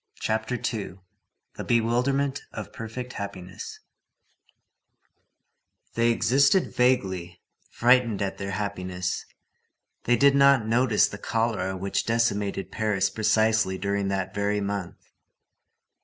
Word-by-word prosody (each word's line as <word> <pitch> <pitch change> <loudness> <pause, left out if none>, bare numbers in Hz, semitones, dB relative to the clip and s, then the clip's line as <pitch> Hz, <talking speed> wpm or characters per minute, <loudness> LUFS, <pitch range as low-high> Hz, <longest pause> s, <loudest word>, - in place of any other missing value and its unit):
CHAPTER 110 +3 -1
II—THE 95 -6 -7
BEWILDERMENT 125 +4 +1
OF - - -7
PERFECT 125 +2 -7
HAPPINESS 95 -3 -7 2.1
They 115 0 +2
existed 135 - +3
vaguely, 95 -9 0 0.3
frightened 120 -3 +3
at 95 - -4
their 100 0 -4
happiness. 95 -3 -3 0.8
They 120 - +4
did 140 0 +5
not 140 -4 +5
notice 115 -1 +3
the 100 - -9
cholera 110 -5 -1
which 100 +1 -2
decimated 100 -5 0
Paris 100 -3 0
precisely 110 -2 +2
during 100 +1 -1
that 95 0 -2
very 100 0 0
month. 100 -3 -3
110 Hz, 100 wpm, -26 LUFS, 95-120 Hz, 2.1 s, did